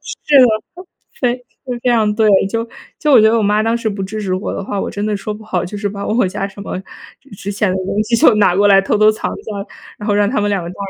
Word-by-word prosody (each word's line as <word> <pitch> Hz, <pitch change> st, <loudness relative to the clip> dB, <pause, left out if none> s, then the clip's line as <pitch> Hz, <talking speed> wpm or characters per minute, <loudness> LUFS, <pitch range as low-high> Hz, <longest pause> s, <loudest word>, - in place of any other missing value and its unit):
是 290 Hz, -2 st, +1 dB
的， 250 Hz, -, +7 dB, 0.7 s
非 245 Hz, -1 st, +1 dB, 0.5 s
非 250 Hz, -, +2 dB
常 220 Hz, -3 st, +2 dB
对， 220 Hz, 0 st, +3 dB, 0.2 s
就 230 Hz, +2 st, -3 dB, 0.3 s
就 300 Hz, -1 st, +1 dB
我 240 Hz, -, +8 dB
觉 220 Hz, -, +5 dB
得 230 Hz, -, +2 dB
我 220 Hz, -, +1 dB
妈 210 Hz, +1 st, +2 dB
当 225 Hz, +1 st, +1 dB
时 230 Hz, -1 st, -2 dB
不 200 Hz, -2 st, -4 dB
支 215 Hz, +3 st, -5 dB
持 185 Hz, -3 st, -2 dB
我 185 Hz, -, -3 dB
的 -, -, -4 dB
话， 200 Hz, 0 st, -3 dB
我 -, -, -3 dB
真 205 Hz, +1 st, -4 dB
的 210 Hz, -1 st, -1 dB
说 210 Hz, +2 st, -5 dB
不 215 Hz, +1 st, -10 dB
好， 185 Hz, -4 st, -2 dB
就 180 Hz, +4 st, -7 dB
是 205 Hz, 0 st, -2 dB
把 200 Hz, 0 st, -6 dB
我 220 Hz, -1 st, +1 dB
家 195 Hz, +1 st, -3 dB
什 200 Hz, +1 st, -11 dB
么 190 Hz, -, -5 dB, 0.6 s
值 200 Hz, +1 st, -5 dB
钱 200 Hz, -1 st, 0 dB
的 185 Hz, -, -1 dB
东 205 Hz, +2 st, -1 dB
西 230 Hz, +2 st, 0 dB
就 225 Hz, -, +5 dB
拿 190 Hz, -4 st, +3 dB
过 205 Hz, +1 st, +4 dB
来 195 Hz, -1 st, +6 dB
偷 195 Hz, -, 0 dB
偷 215 Hz, 0 st, +6 dB
藏 215 Hz, -, -4 dB
在， -, -, -12 dB, 0.6 s
然 210 Hz, -, -7 dB
后 205 Hz, -, +2 dB
让 205 Hz, 0 st, +2 dB
他 255 Hz, -, 0 dB
们 205 Hz, -, 0 dB
两 195 Hz, -3 st, -1 dB
个 170 Hz, -, -6 dB
干 -, -, -12 dB
210 Hz, 305 characters per minute, -17 LUFS, 200-220 Hz, 0.7 s, 我